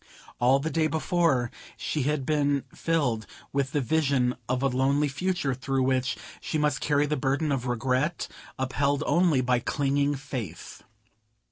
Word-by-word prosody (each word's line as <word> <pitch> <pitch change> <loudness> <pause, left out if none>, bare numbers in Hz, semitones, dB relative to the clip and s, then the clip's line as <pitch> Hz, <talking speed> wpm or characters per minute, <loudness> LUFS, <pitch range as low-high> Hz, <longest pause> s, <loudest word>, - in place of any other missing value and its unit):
All 125 +2 +5
the 155 +4 -2
day 160 -1 +2
before 160 -5 +1 0.3
she 150 - -2
had 140 0 0
been 145 -2 +1
filled 130 -10 0 0.3
with 135 -1 0
the 145 - +1
vision 135 -2 +2
of 130 +1 0
a - - +4
lonely 135 +3 +2
future 160 0 -1
through 135 +1 -1
which 130 -1 +1 0.2
she 155 - -2
must 150 -3 +1
carry 145 0 +2
the 150 +1 0
burthen 140 +3 0
of 130 -2 -1
regret, 130 +6 0 0.3
upheld 140 +2 0
only 170 -6 +3
by 125 -1 +2
clinging 140 +3 +1
faith. 125 - -6
140 Hz, 150 wpm, -27 LUFS, 130-150 Hz, 0.3 s, All